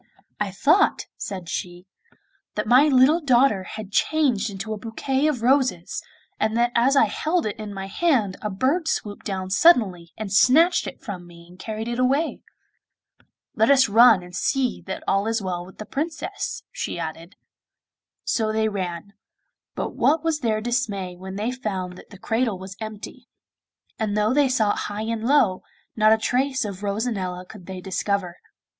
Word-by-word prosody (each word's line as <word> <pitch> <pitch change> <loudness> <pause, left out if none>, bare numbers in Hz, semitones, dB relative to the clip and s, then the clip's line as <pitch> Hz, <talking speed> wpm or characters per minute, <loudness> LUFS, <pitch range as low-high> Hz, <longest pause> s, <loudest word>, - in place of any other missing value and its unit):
'I 205 -2 -1
thought,' 310 - +3
said 185 -4 -6
she, 175 0 -5 0.7
'that 210 - -1
my 255 +6 +6
little 280 +4 +5
daughter 255 -7 +3
had 215 -1 -8
changed 250 -5 +1
into 200 +2 -5
a - - -5
bouquet 265 +6 -1
of 260 -7 -1
roses, 255 -9 +1 0.4
and 220 +1 0
that 240 0 +2
as 245 +4 +3
I 275 - +6
held 315 - -1
it 210 - -2
in 210 -1 -6
my 195 -1 -5
hand 215 - +1
a 210 - -2
bird 270 - 0
swooped 205 -9 -3
down 190 -2 -4
suddenly 190 - +4
and 210 -3 -5
snatched 285 - +5
it - - -9
from 185 -8 -7
me 170 0 -15
and 180 +1 -17
carried 220 +2 -5
it 240 +1 -3
away.' 275 +6 +1 1.1
'Let 220 -3 +2
some 255 -6 +3
one 230 +2 +8
run 225 -7 +6
and 180 0 -11
see 260 +5 0
that 190 - -5
all 195 +2 +1
is 225 +1 0
well 180 -3 -3
with 190 - -15
the 215 - -7
Princess,' 320 - -4
she - - -4
added. 165 +2 -6 0.9
So 220 -2 0
they 220 0 +1
ran; 185 -1 -5 0.6
but - - -3
what 310 +2 +2
was 325 -2 0
their 220 -5 0
dismay 215 -6 -2
when 190 +1 -8
they 215 +4 -2
found 190 -8 -4
that - - -14
the 200 - -12
cradle 225 0 -1
was 190 +1 -9
empty; 220 +3 -8 0.7
and 210 -2 -1
though 210 +3 +2
they 285 -1 +3
sought 220 -5 +1
high 205 +1 -4
and 225 0 -3
low, 250 -10 +3 0.3
not 215 0 +4
a 220 - +6
trace 260 +3 0
of 200 -2 -6
Rosanella 200 -4 -2
could 185 -1 -13
they 190 -1 -6
discover. 190 -1 -2
215 Hz, 175 wpm, -23 LUFS, 190-255 Hz, 1.1 s, one